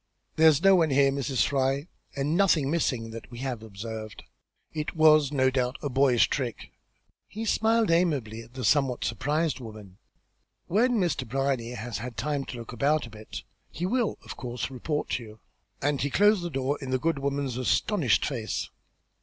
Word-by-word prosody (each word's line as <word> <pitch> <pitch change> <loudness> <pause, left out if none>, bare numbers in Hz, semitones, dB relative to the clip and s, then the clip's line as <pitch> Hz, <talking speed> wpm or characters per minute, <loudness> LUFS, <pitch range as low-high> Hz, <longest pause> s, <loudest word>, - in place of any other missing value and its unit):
"There's 160 0 +5
no 195 -1 +7
one 165 -3 +3
here, 140 0 +4
Mrs. 135 -1 0
Fry; 135 +2 0 0.3
and 145 +3 0
nothing 170 -7 +3
missing, 125 -9 -1
that 115 0 -9
we 120 - -10
have 125 -4 -3
observed. 110 0 -7 0.5
It 155 +1 -4
was, 155 -3 +5
no 130 -2 +2
doubt, 125 -1 -1
a 145 - -1
boyish 130 -2 +4
trick." 125 -7 -4 0.6
He 220 +2 -6
smiled 225 -2 +2
amiably 140 -11 +1
at 115 +2 -16
the 130 -3 -3
somewhat 130 +2 +2
surprised 150 +6 -1
woman. 105 -5 -11 0.7
"When 235 +7 +2
Mr. 175 - 0
Brierly 135 -1 -1
has 110 -1 -5
had 120 +1 -7
time 140 +4 -1
to 125 - -7
look 115 0 -8
about 145 +5 +1
a 115 - -12
bit 110 0 -9 0.3
he 175 - -4
will 235 +3 0
of - - -7
course 125 +1 -5
report 150 +4 -3
to 120 - -2
you." 110 -1 -13 0.4
And 145 -1 +1
he 140 - 0
closed 205 +5 +4
the 175 - -3
door 135 0 -1
in 135 - -5
the 130 - +1
good 160 +2 0
woman's 140 -2 -2
astonished 135 - +2
face. 120 -6 -3
135 Hz, 180 wpm, -27 LUFS, 120-155 Hz, 0.7 s, no